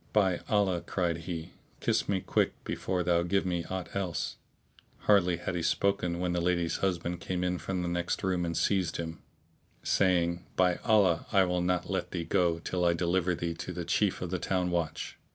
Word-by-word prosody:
"By 95 -4 +3
Allah," 100 -5 +2
cried 85 -3 -1
he, 85 0 -4 0.3
"kiss - - 0
me 95 -2 +1
quick - - +1
before 90 -1 -2
thou 85 0 +3
give 95 +3 +1
me 85 -2 -1
aught 95 -1 -5
else."[FN#642] 95 -4 -6
Hardly 90 -4 +4
had 85 - -4
he 90 - -1
spoken, 90 0 +1
when 90 -1 0
the 90 - 0
lady's 85 -1 +1
husband 90 -2 -1
came 90 +1 -2
in 90 -1 0
from 90 -2 -2
the - - -2
next 85 0 -1
room[FN#643] 90 -2 +1
and 85 - -2
seized 95 -5 +1
him, 80 -1 -5 0.6
saying, 85 -2 +2
"By 90 -1 +3
Allah, 100 -7 +3
I 100 -1 +5
will 90 -1 0
not 90 0 0
let - - -1
thee 85 - -3
go, 85 0 +2
till 90 +2 -2
I 85 -1 +4
deliver 90 +1 +1
thee 85 0 -2
to 85 - -6
the 90 -1 -4
chief 95 +3 +1
of 90 - -4
the 90 - -1
town 90 +1 0
watch." 85 -2 -2
90 Hz, 195 wpm, -30 LUFS, 85-95 Hz, 0.6 s, I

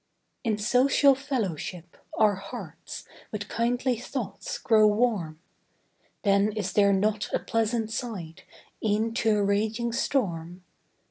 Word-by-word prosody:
In 220 -4 0
social 260 +6 +4
fellowship, 195 - -4 0.2
our 215 -1 +5
hearts 195 +1 -8 0.2
With 210 -1 -4
kindly 245 +1 0
thoughts 245 - -5
grow 215 -2 +5
warm; 210 -8 +1 0.9
Then 200 0 +3
is 200 -3 -3
there 200 -1 +5
not 205 +2 +1
a - - +4
pleasant 225 0 -1
side, 195 -9 -5 0.4
E'en 220 +1 +1
to 220 -2 +2
a 205 - +2
raging 215 +4 0
storm? 180 -9 -1
215 Hz, 120 wpm, -27 LUFS, 200-235 Hz, 0.9 s, our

